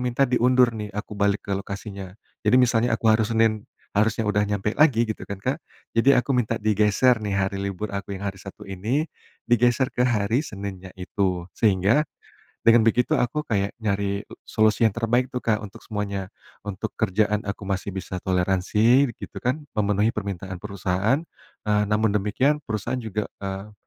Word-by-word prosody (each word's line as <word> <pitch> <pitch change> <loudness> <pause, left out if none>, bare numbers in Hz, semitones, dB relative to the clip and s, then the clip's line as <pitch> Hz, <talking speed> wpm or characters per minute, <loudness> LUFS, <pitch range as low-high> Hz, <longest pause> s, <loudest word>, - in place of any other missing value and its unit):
minta 125 +2 +1
diundur 125 0 +4
nih, 105 -1 -4
aku 105 +1 -5
balik 100 0 +1
ke 100 - -2
lokasinya." 100 -1 -7 0.3
Jadi 125 - +5
misalnya, 120 -1 +3
aku - - -19
harus 110 0 +2
Senin 110 -2 +2 0.3
harusnya 110 +1 +2
udah 105 0 +2
nyampe 105 +1 -1
lagi 135 -7 +5
gitu 110 - -4
kan 100 -1 -6
Kak, 130 +4 -1 0.4
jadi 125 +2 +5
aku 140 - -7
minta 115 -2 +1
digeser 110 +3 +3
nih 100 - -2
hari 95 0 0
libur 100 +1 -3
aku 100 0 -5
yang 95 - -7
hari 95 - -6
Sabtu 95 0 -10
ini 115 - -1 0.4
digeser 120 +2 +3
ke 125 +1 +1
hari 110 +2 +1
Seninnya 100 -5 -7
itu. 90 -1 -2
Sehingga 105 - +3 0.6
dengan 115 0 +7
begitu, 120 +2 +2
aku 150 +5 0
kayak 100 -2 0
nyari 100 -1 -1 0.2
solusi 110 +1 +2
yang 110 - +5
terbaik 120 +3 +1
tuh 125 - -1
Kak 110 -1 0
untuk 100 - -9
semuanya, 100 -3 -3 0.4
untuk 95 -2 -4
kerjaan 105 0 +1
aku 100 0 -4
masih 95 0 -2
bisa 95 0 -4
toleransi 95 +9 +3
begitu - - -9
kan, 135 +5 -1
memenuhi 105 +1 +2
permintaan 95 -3 -5
perusahaan, 100 - 0 0.4
eee, 105 0 +2
namun 105 0 +2
demikian 110 +9 +1
perusahaan 115 +4 -2
juga, 110 -2 -3 0.2
eee, 100 +1 -5
105 Hz, 165 wpm, -24 LUFS, 100-120 Hz, 0.6 s, dengan